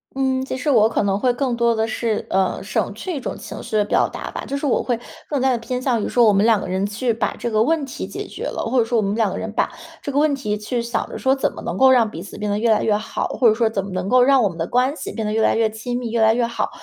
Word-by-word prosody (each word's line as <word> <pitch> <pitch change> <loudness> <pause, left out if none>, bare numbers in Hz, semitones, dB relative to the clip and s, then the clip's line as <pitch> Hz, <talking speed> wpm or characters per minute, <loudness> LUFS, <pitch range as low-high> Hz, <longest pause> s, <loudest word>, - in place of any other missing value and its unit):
嗯， 265 -1 0
其 260 0 -4
实 275 +3 -2
我 225 -4 +5
可 225 - 0
能 195 -1 +1
会 250 +4 +2
更 245 0 -1
多 235 0 +2
地 220 0 0
是， 220 -1 -2
呃， 190 -1 0
省 200 +1 -2
去 345 - -5
一 280 - -3
种 - - -4
情 - - -8
绪 225 -2 -2
的 210 - +2
表 - - +2
达 - - -6
吧。 - - -6
就 280 - -3
是 290 - -4
我 270 - +1
会 240 -2 -1 0.3
更 285 -3 -1
加 265 0 +3
地 245 - +1
偏 250 +2 -4
向 245 -5 0
于 - - -2
说 240 -1 +4
我 210 - +5
们 200 +2 +3
两 225 -3 +4
个 - - -5
人 190 +2 -1
去 230 +4 -1
把 220 - -1
这 235 - -2
个 215 0 +2
问 310 +2 +1
题 270 - -6
解 - - -6
决 - - -8
了， - - -4
或 260 - 0
者 235 - +5
说 230 +1 0
我 - - +3
们 200 0 -1
两 220 -4 +1
个 - - -4
人 - - -4
把 - - 0 0.3
这 285 - -4
个 285 - +1
问 300 -2 +3
题 210 -6 -2
去 215 +3 -2
想 235 +1 -2
着 - - -6
说 265 0 +2
怎 270 - 0
么 - - -9
能 175 - -4
够 265 +4 +6
让 235 -4 +4
彼 165 - -7
此 195 - -10
变 210 0 -2
得 205 - 0
越 230 0 +1
来 215 - +3
越 210 -1 +2
好， 215 - -3
或 245 - +2
者 215 - +6
说 225 0 +1
怎 195 -3 -2
么 - - -7
能 185 +1 -2
够 255 0 +5
让 265 0 +5
我 205 - +3
们 170 - -10
的 165 - -2
关 255 +3 +2
系 - - -6
变 220 - -3
得 210 - -1
越 220 +1 +1
来 - - +3
越 225 -1 +2
亲 240 +3 -4
密、 240 -3 -4
越 235 - 0
来 220 0 +5
越 240 0 +1
好， 230 0 -2
230 Hz, 360 characters per minute, -21 LUFS, 210-255 Hz, 0.3 s, 够